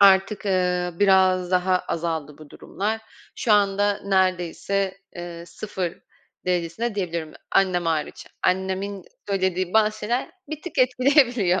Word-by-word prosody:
artık, 195 +1 +5
eee, 180 -2 +1
biraz 185 -2 +4
daha 185 0 +3
azaldı 160 -4 -3
bu 155 -2 -13
durumlar. 215 +3 -3 0.3
Şu 225 - +1
anda 205 0 +3
neredeyse, 190 0 0 0.2
eee, 175 -1 -7
0 180 -1 -5 0.5
derecesinde 180 +6 -1
diyebilirim, 170 -5 -3 0.2
annem 180 -3 +3
hariç. 160 -2 -2 0.2
Annemin 190 +1 -1 0.2
söylediği 185 -2 0
bazı 215 0 +3
şeyler 240 +5 -1 0.2
bir 310 -1 -6
tık 355 -6 -6
etkileyebiliyor. 250 - +4
190 Hz, 120 wpm, -24 LUFS, 180-205 Hz, 0.5 s, artık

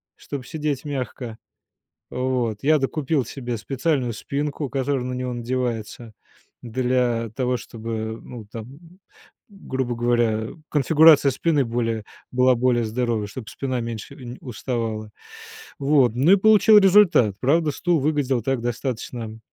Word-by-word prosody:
чтобы 140 -3 -7
сидеть 150 -2 -3
мягко. 125 -4 -5 0.7
Вот. 125 -4 -1
Я 155 +2 +5
докупил 140 +1 0
себе 120 0 -5
специальную 130 +1 -1
спинку, 145 +4 -3
которая 135 -1 -1
на 125 - -3
него 125 0 -3
надевается 120 -2 -3 0.5
для 125 -1 0
того, 125 -1 0
чтобы, 110 -1 -5
ну, 115 -4 -10
там, 110 +1 -8
м, 165 +7 -16 0.5
грубо 130 -11 -4
говоря, 115 -2 +1 0.2
конфигурация 150 -1 +6
спины 150 +1 +1
более 115 -2 -2 0.3
была 125 0 +4
более 120 0 +2
здоровой, 115 -2 -1
чтобы 110 +2 -8
спина 130 -2 -3
меньше 115 +3 -6
нь 125 -3 -9
уставала. 115 -3 -4 0.7
Вот, 135 -5 +3
ну 145 +9 +5
и - - +9
получил 215 +1 +6
результат. 190 - +5
Правда, 155 +4 +2
стул 170 +3 0
выглядел 140 -4 +1
так 135 -2 -1
достаточно 120 -2 -4
125 Hz, 130 wpm, -23 LUFS, 115-140 Hz, 0.7 s, и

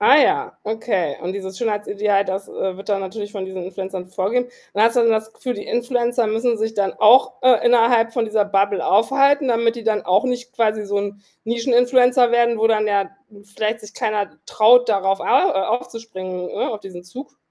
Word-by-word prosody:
Ah 270 +7 +6
ja, 425 +8 +1
okay 210 - -2
und 180 +2 -3
dieses 190 -1 -7
Schönheitsideal, 205 -2 -1
das, 195 +1 -5
äh, 190 -1 -4
wird 195 - -11
dann 200 -1 +1
natürlich 205 +2 -6
von 195 -3 -6
diesen 190 -1 -7
Influencern 185 0 -7
vorgege 225 +7 -1 0.2
man 210 +2 +2
hat 230 - +1
so 235 -2 +2
das 220 0 0
Gefühl, 250 +1 -5
die 205 - -8
Influencer 240 -1 -1
müssen 225 +1 0
sich 220 0 -2
dann 200 -2 -1
auch, 255 +4 +5
äh, 255 -3 +4
innerhalb 230 -1 +3
von 235 -2 0
dieser 215 -1 0
Bubble 200 -3 0
aufhalten, 275 +7 +3
damit 235 -1 +1
die 230 - -8
dann 215 -2 0
auch 185 +7 +2
nicht 250 0 -4
quasi 215 -3 0
so 205 0 -3
'n 200 0 -5 0.2
Nischen-Influencer 245 +1 +3
werden, 235 -1 +2
wo 225 - +3
dann, 215 -1 +1
ja, 200 -1 0 0.5
vielleicht 215 +2 -2
sich 210 0 -13
keiner 210 -2 -2
traut, 240 +3 +4
darauf 195 -2 +1
au - - -5
äh, - - +3
aufzuspringen, 215 -6 -5
ne, - - -3
auf 210 - -6
diesen 180 -2 -11
Zug? 265 +9 -11
220 Hz, 195 wpm, -20 LUFS, 200-240 Hz, 0.5 s, Ah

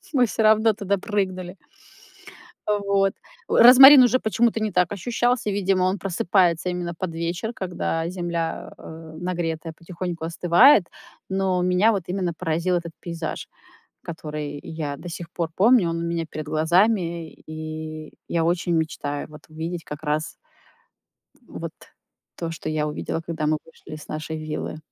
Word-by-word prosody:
Мы 255 -3 +4
всё 225 - -2
равно 220 +1 +5
туда 200 -1 -1
прыгнули. 185 -2 -3 1.1
А 210 -1 +1
вот. 200 -1 +1 0.3
Розмарин 265 +3 +9
уже 250 +1 +3
почему-то 225 +1 +1
не 215 -1 -1
так 180 0 +2
ощущался. 240 +3 0
Видимо, 195 -2 +1
он 185 +2 +1
просыпается 180 -2 +1
именно 175 -1 -3
под 165 0 -5
вечер, 170 +7 -3
когда 175 -4 -3
земля, 170 -2 -4
э, 160 0 -11
нагретая 165 -2 -3
потихоньку 170 0 -6
остывает. 175 - +5 0.4
Но 190 -1 0
меня 180 +5 +3
вот 195 - -2
именно 180 -2 -2
поразил 170 +2 -1
этот 170 -1 -3
пейзаж, 170 -2 -5 0.6
который 150 -3 -6
я 150 -3 -5
до 175 +4 -9
сих 170 0 -7
пор 170 -2 -2
помню. 210 -3 +4
Он 165 - -2
у - - -3
меня 170 -1 -2
перед 155 -1 -6
глазами. 170 +1 +1
И 155 0 -7 0.2
я 165 -1 0
очень 175 0 0
мечтаю 145 -3 -2
вот 150 -1 -13
увидеть 165 +2 -5
как 150 +1 -8
раз, 150 +1 -2 1.1
м, - - -9
вот - - -5 0.6
то, 165 -1 -4
что 160 - -7
я 155 -1 -1
увидела, 150 +2 -4
когда 160 -2 -3
мы 155 0 +2
вышли 160 -1 -12
с 150 - -11
нашей 155 +1 -5
виллы. 155 0 -4
170 Hz, 150 wpm, -23 LUFS, 160-195 Hz, 1.1 s, Розмарин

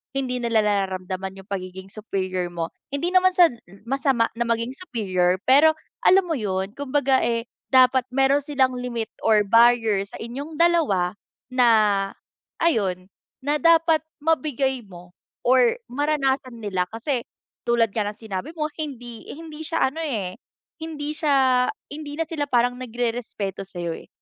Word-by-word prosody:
Hindi 255 -2 -1
nila 230 -2 +2
nararamdaman 190 -2 -2
yung 200 - -32
pagiging 190 0 -6
superior 185 -4 -3
mo, 170 -1 -4 0.2
hindi 340 +6 -1
naman 370 0 +5
sa 350 -2 +7 0.4
masama 270 -3 +1
na 235 - 0
maging 230 +1 0
superior 190 - 0
pero 295 +4 +6 0.3
alam 385 +1 +6
mo 330 - 0
yun 190 -2 -2
kumbaga 275 -1 +2
eh 230 0 -1 0.3
dapat 260 0 +6
meron 270 +2 +3
silang 265 -3 +1
limit 235 -3 -3 0.2
or 215 -2 +5
barrier 230 -2 +4
sa - - -11
inyong 280 +7 -6
dalawa 295 - +3 0.4
na, 250 -1 +4 1.0
ayun 195 - +1 0.4
na 295 +1 +2
dapat 330 -1 +5 0.2
mabigay 275 -4 0
mo 180 -1 -13 0.3
or 250 - +4
maranasan 270 -3 0
nila. 190 -5 -2
Kasi 240 +3 -2 0.5
tulad 230 -3 +2
nga 210 -2 0
ng 210 - -8
sinabi 220 +4 -5
mo 305 - 0
hindi 245 -6 -6
hindi 315 0 -9
siya 325 -4 +1
ano 320 +3 -6
eh 215 - -3 0.4
hindi 300 -2 -4
siya 270 -5 +3 0.2
hindi 290 0 -6
na 325 - 0
sila 300 -3 -2
parang 245 0 +2
nagrerespeto 230 -5 -3
sayo 175 -3 -4
eh. - - -13
245 Hz, 145 wpm, -23 LUFS, 205-290 Hz, 1.0 s, sa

